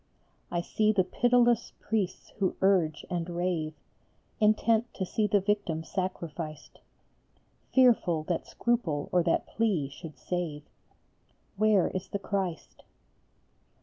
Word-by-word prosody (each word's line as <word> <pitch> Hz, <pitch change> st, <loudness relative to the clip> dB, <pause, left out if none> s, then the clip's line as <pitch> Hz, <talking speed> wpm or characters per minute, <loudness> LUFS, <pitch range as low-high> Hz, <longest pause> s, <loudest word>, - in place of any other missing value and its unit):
I 175 Hz, -, -1 dB
see 215 Hz, +4 st, +1 dB
the 200 Hz, -3 st, +3 dB
pitiless 240 Hz, +3 st, +2 dB
priests 205 Hz, -5 st, -2 dB
who 190 Hz, -2 st, +1 dB
urge 185 Hz, -5 st, +2 dB
and 175 Hz, -1 st, -3 dB
rave, 170 Hz, -3 st, -2 dB, 0.6 s
Intent 220 Hz, +2 st, +3 dB
to 190 Hz, -, -2 dB
see 210 Hz, +3 st, 0 dB
the 205 Hz, 0 st, +3 dB
victim 195 Hz, -5 st, -1 dB
sacrificed, 165 Hz, -4 st, -5 dB, 0.9 s
Fearful 230 Hz, -11 st, +4 dB
that 170 Hz, +1 st, -2 dB
scruple 190 Hz, -12 st, -1 dB
or 180 Hz, -, +4 dB
that 170 Hz, -1 st, +1 dB
plea 195 Hz, -11 st, 0 dB
should 155 Hz, +2 st, -10 dB
save 170 Hz, -5 st, -3 dB, 0.9 s
Where 210 Hz, -2 st, +3 dB
is 185 Hz, 0 st, -4 dB
the 200 Hz, -, -3 dB
Christ? 195 Hz, -4 st, -4 dB
185 Hz, 115 wpm, -29 LUFS, 165-215 Hz, 0.9 s, Fearful